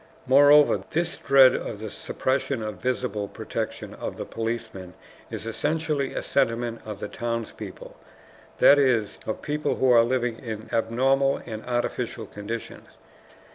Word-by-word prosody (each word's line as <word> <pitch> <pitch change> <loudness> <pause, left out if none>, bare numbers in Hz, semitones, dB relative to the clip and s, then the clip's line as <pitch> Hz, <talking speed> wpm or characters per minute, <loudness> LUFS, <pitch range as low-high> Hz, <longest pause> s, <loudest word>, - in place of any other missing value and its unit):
Moreover 145 +2 +6
this 170 +1 -1
dread 135 -2 +6
of 110 - -4
the 110 0 -7
suppression 130 -2 -2
of 105 -3 -5
the - - -21
visible 125 -5 -1
protection - - -5
of - - -6
the - - -5
policeman 110 -5 -5 0.3
is - - -6
essentially 150 +3 -1
a - - -2
sentiment 120 -3 0
of 105 -1 -5
townspeople, 115 -1 -5 0.6
that 145 - +7
is, 120 -7 +1
of 110 - -4
people 150 0 -1
who 130 -1 +3
are 115 -1 +7
living 120 -1 -1
in 110 -3 -6
abnormal 135 +4 +1
and 110 -2 -6
artificial 120 -1 -2
conditions. 110 +3 -7
120 Hz, 135 wpm, -25 LUFS, 110-135 Hz, 0.6 s, that